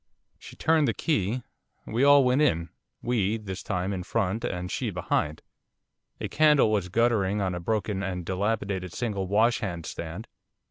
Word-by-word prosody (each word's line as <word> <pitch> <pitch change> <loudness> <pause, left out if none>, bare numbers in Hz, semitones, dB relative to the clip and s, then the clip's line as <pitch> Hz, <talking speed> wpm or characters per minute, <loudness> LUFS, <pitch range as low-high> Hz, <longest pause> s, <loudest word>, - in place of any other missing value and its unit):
She - - -12
turned 160 -2 +3
the 115 - 0
key. 120 - 0 0.4
We 115 +4 0
all 145 0 +7
went 125 +3 +3
in 85 - +2 0.3
we, 110 -3 +1
this 100 -3 -6
time, 95 0 -2
in 95 - -3
front, 105 +2 -1
and 90 +1 -3
she 125 - -2
behind. 85 -4 -1 0.8
A - - -3
candle 150 -7 +4
was 100 -4 0
guttering 105 -2 +2
on 95 -2 0
a 90 - -3
broken 105 +1 -1
and 90 -3 -3
dilapidated 95 -1 -2
single 105 -6 -2
washhand 100 -5 +1
stand. 85 +7 -6
100 Hz, 155 wpm, -27 LUFS, 90-115 Hz, 0.8 s, all